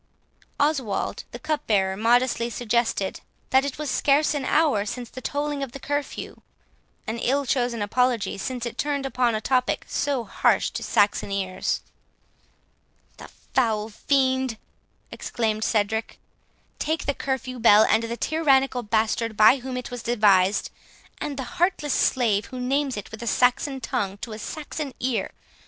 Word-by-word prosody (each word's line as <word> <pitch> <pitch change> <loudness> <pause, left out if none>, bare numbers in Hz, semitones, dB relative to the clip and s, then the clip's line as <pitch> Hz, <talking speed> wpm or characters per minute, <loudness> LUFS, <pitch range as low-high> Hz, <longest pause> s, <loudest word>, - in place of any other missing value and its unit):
11 285 - +5
Oswald 205 -5 -3
the - - -8
cupbearer 205 -11 0
modestly 235 +2 +2
suggested, 235 -4 -1 0.3
"that 265 +1 +5
it 280 -1 -4
was 300 -3 -3
scarce 290 +3 +3
an 285 -3 -2
hour 290 -11 +3
since 240 +2 -6
the 255 - -8
tolling 290 0 -2
of 270 -3 -4
the 275 - -7
curfew;" 290 +1 -4 0.6
an 225 +1 -3
ill 275 +4 +1
chosen 245 -4 0
apology, 245 +1 +1
since 245 +4 -4
it 235 - -6
turned 285 -2 -1
upon 250 -3 +1
a - - 0
topic 255 0 0
so 280 -4 -1
harsh 205 - +1
to - - -5
Saxon 205 0 +1
ears. 190 -2 -1 1.4
"The - - -10 0.3
foul 220 -4 +1
fiend," 260 0 +1 0.5
exclaimed 220 -2 -2
Cedric, 220 +1 0 0.6
"take 315 +1 -1
the 285 - +1
curfew 260 -2 -3
bell, 215 -2 +7
and 220 +1 +3
the 230 +1 -4
tyrannical 270 -5 +2
bastard 220 0 0
by 215 +5 +7
whom 255 0 -5
it 250 - -6
was 245 -1 -5
devised, 210 -5 +3 0.5
and 285 -2 -4
the 265 - -2 0.2
heartless 325 -6 +2
slave 220 -6 +2
who 255 - -7
names 270 0 0
it 205 - -7
with 220 0 -8
a 235 - -5
Saxon 265 +3 +2
tongue 200 -5 -2
to 225 - -6
a 215 - -7
Saxon 295 +2 -5
ear! 245 -6 -1
245 Hz, 155 wpm, -24 LUFS, 220-270 Hz, 1.4 s, bell